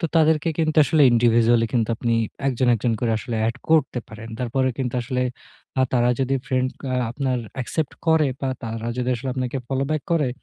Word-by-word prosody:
তো 170 - -2
তাদেরকে 160 0 +3
কিন্তু 155 -1 +1
আসলে 155 0 +3
indivisually 115 0 +4
কিন্তু 115 -3 +1
আপনি 115 0 0 0.3
একজন 130 0 0
একজন 115 +1 0
করে 115 -2 +1
আসলে 115 +1 -4
এড 115 +2 -1
করতে 150 -5 +3
পারেন। 110 +1 -9
তারপরে 130 +1 0
কিন্তু 125 -2 -2
আসলে 125 +1 -1 0.6
আ - - +5
তারা 120 -1 +3
যদি 135 +1 +1
ফ্রেন্ড 130 -1 +1 0.4
আপনার 130 0 -1 0.2
accept 155 +4 -3
করে 160 -3 +4
বা 135 - -1 0.2
তারা 115 0 -4
যদি 125 0 -1
আসলে 130 +3 -5
আপনাকে 130 +1 -2
follow 135 0 -1
back 155 -2 0
করে 150 -5 +2
130 Hz, 185 wpm, -23 LUFS, 120-140 Hz, 0.6 s, আ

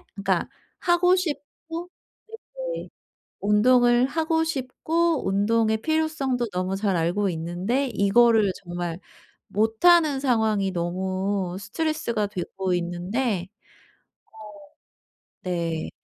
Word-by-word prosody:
그러니까 195 -3 0 0.3
하고 360 +1 +4
싶고 330 +1 -5 0.9
네네 - - -7 0.5
운동을 240 +4 +4
하고 320 +2 0
싶고 320 - -1
운동의 220 +3 +2
필요성도 310 -6 0
너무 185 +1 -2
잘 200 -2 0
알고 175 +5 +1
있는데 180 +11 -1
이거를 220 -1 +4
정말 175 -1 -4 0.5
못하는 280 - +4
상황이 220 -7 +1
너무 185 +1 -2
스트레스가 235 - -2
되고 190 -1 -3
있는데 180 +4 -2 2.0
어 - - -3
네. 170 -2 -2
215 Hz, 215 characters per minute, -25 LUFS, 185-275 Hz, 2.0 s, 하고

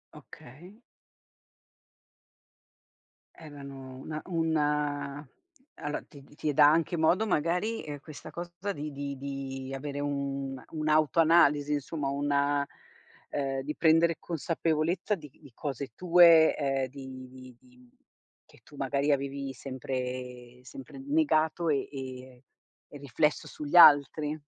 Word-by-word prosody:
Okay. 175 - -14 2.6
Erano 140 -4 -10
una 155 +3 -6
una 150 -4 -1 0.5
allo 145 0 -4
ti 140 -2 -15
ti 150 +1 -4
dà 145 +1 +7
anche 165 +1 +1
modo 180 +7 +2
magari, 180 +6 0
ehm, 145 -1 -7
questa 150 0 -11
cosa 175 +3 -5
di 150 -1 -6
di 140 0 -5
di 135 -1 -6
avere 140 +1 -5
una 140 -2 -3
un'autoanalisi 155 -1 +3
insomma 145 0 -3
una 140 0 +1 0.7
uhm, 135 -2 -2
di 150 +3 -5
prendere 165 +1 +4
consapevolezza 165 +4 -1
di 155 -5 -12
di 140 0 -18
cose 140 0 -5
tue, 170 -2 +6
uhm, 135 -2 0
di 130 -1 -10
di 130 -1 -13
di 125 -1 -22 0.6
che - - -22
tu 145 - -17
magari 140 +2 0
avevi 140 0 -2
sempre 125 -1 -6
sempre 135 - -11
negato 175 - +1
e 140 -3 0
e 130 -2 -9 0.5
e 145 - -10
riflesso 145 +2 0
sugli 150 +3 -6
altri? 150 -1 +6
145 Hz, 115 wpm, -29 LUFS, 135-160 Hz, 2.6 s, dà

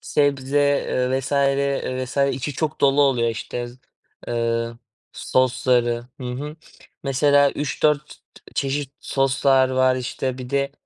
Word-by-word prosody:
sebze, 140 -1 +1
eee, 135 -2 +1
vs. 135 - -6 0.7
vs. 130 - -6 0.2
içi 135 +3 -4
çok 155 +2 -3
dolu 140 +1 +4
oluyor, 125 -4 +2
işte, 120 +2 -5 0.6
ııı, 115 0 -1 0.3
sosları. 125 -2 +1 0.2
Hı - - -6
hı. 150 +5 -6 0.5
Mesela, 140 +1 +3
3-4 150 +1 -1 0.4
çeşit 140 0 -2
soslar 135 -1 +2
var, 130 0 +3
işte. 130 0 -3
Bir 125 -1 -7
de 140 0 0
135 Hz, 115 wpm, -22 LUFS, 125-140 Hz, 0.7 s, dolu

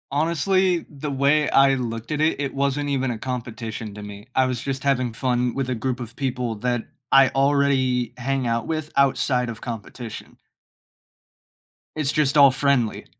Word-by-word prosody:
Honestly, 170 +4 +1
the 150 0 -6
way 140 +2 +2
I 135 0 +5
looked 115 -2 -4
at 150 - -1
it, 155 -1 +1
it 140 - -3
wasn't 140 +1 -1
even 135 -2 0
a 115 - -4
competition 115 -3 -5
to 105 0 -9
me, 105 +1 -10
I 130 - +4
was 125 -2 -2
just 135 -1 -4
having 130 -4 +1
fun 125 0 0
with 135 -1 -2
a 130 - 0
group 125 +2 -3
of 120 +1 -8
people 125 -4 -2
that 120 +2 -1 0.3
I 135 -1 +7
already 135 -3 +1
hang 135 +1 -1
out 115 -1 -1
with 155 -1 -3
outside 130 -2 +2
of 115 -2 -7
competition. 115 0 -7 1.6
It's 150 -3 0
just 150 -1 +2
all 140 -2 +8
friendly. 135 -4 +1
130 Hz, 170 wpm, -23 LUFS, 120-140 Hz, 1.6 s, all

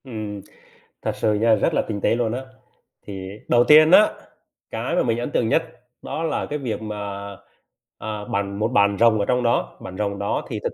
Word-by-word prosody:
Ừm, 110 -5 -6 0.6
thật - - -1
sự 110 - +1
nha, 110 +2 +3
rất 105 - 0
là - - +2
tinh 105 -2 -5
tế - - +2
luôn 115 -2 -1
á. 130 +2 -4 0.6
Thì 95 -2 -6 0.2
đầu 120 0 +4
tiên 155 +1 +8
á, 210 +3 +7 0.6
cái - - -2
mà - - +2
mình 115 -1 0
ấn 120 - -4
tượng 115 - +1
nhất - - +3 0.4
đó 160 - -4
là 160 -2 -1
cái 150 - -4
việc 120 -6 -4
mà, 100 -2 -5 0.7
à, 105 -1 -5
bạn 100 -3 -3
một 110 - +1
bạn 100 -4 +2
rồng 115 -2 +5
ở 100 - +1
trong 125 +2 +1
đó, 120 0 0
bạn 95 0 -8
rồng 100 -1 -2
đó 100 - -2
thì - - -3
thực - - -2
110 Hz, 210 wpm, -22 LUFS, 100-120 Hz, 0.7 s, tiên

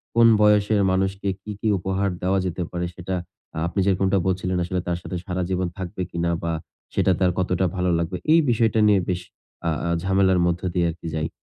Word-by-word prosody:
কোন 115 0 +7
বয়সের 105 0 +4
মানুষকে 95 +1 0
কি, 105 - -7
কি 110 - -2
উপহার 95 +2 -1
দেওয়া 95 +2 +2
যেতে 90 0 -2
পারে, 90 0 -2
সেটা 90 +1 -4 0.4
আ - - -6
আপনি 95 - -3
যেরকমটা 95 0 +2
বলছিলেন 95 0 0
আসলে, 90 +1 -2
তার 85 - 0
সাথে 90 - -6
সারাজীবন 90 0 -1
থাকবে 95 0 -5
কিনা? 85 0 0
বা 85 - -1 0.4
সেটা 95 - +3
তার 90 -1 +3
কতটা 90 0 +1
ভালো 90 -1 0
লাগবে? 85 +2 -2 0.2
এই 165 - +7
বিষয়টা 115 -1 +2
নিয়ে 100 -2 +5
বেশ 90 0 -1 0.5
আ - - +3 0.2
আ - - 0
ঝামেলার 95 -1 +3
মধ্য 85 0 0
দিয়ে 90 -2 +2
আরকি 85 0 -9
যাই। 80 0 -1
95 Hz, 195 wpm, -23 LUFS, 90-100 Hz, 0.5 s, কোন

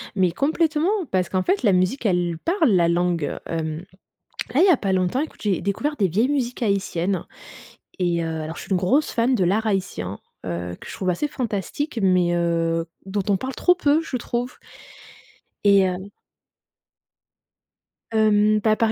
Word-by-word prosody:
Mais 185 -3 +2
complètement, 310 - +1 0.2
parce 185 -2 +1
qu'en 185 -1 0
fait, 390 - +1
la 200 -4 +4
musique, 185 +8 +1
elle 175 -4 +1
parle 330 - +2
la 175 -3 +4
langue. 170 -2 0
Hem, 160 0 -3 0.7
là, 285 - +4
il - - +7
y - - +5
a - - +4
pas 195 -2 -1
longtemps, 185 +8 +1
écoute, 310 - -5
j'ai 200 -4 0
découvert 240 - -2
des 195 - +2
vieilles 215 +10 +1
musiques 250 -4 -2
haïtiennes, 195 -3 0 0.7
et 175 -2 +1
heu, 160 -1 -3
alors 160 +2 -6
je - - -7
suis - - -13
une - - +4
grosse 255 - +1
fan 245 +2 +2
de 190 - +2
l'art 215 +5 +1
haïtien, 140 - -2 0.3
heu, 90 0 -4
que - - -10
je - - -7
trouve 185 -1 -1
assez 295 +12 -1
fantastique, 235 - -3
mais 180 -2 +3
heu, 165 -1 0 0.2
dont 200 +1 -1
on 200 - +3
parle 260 +6 -5
trop 360 - +3
peu, 300 -3 +3
je 285 - -4
trouve 245 +1 -3 1.1
et 200 -2 +5
heu 185 +2 -4 2.0
Hem, 215 -1 +3
bah, 215 +1 +2
par 225 0 +1
195 Hz, 180 wpm, -23 LUFS, 175-245 Hz, 2.0 s, il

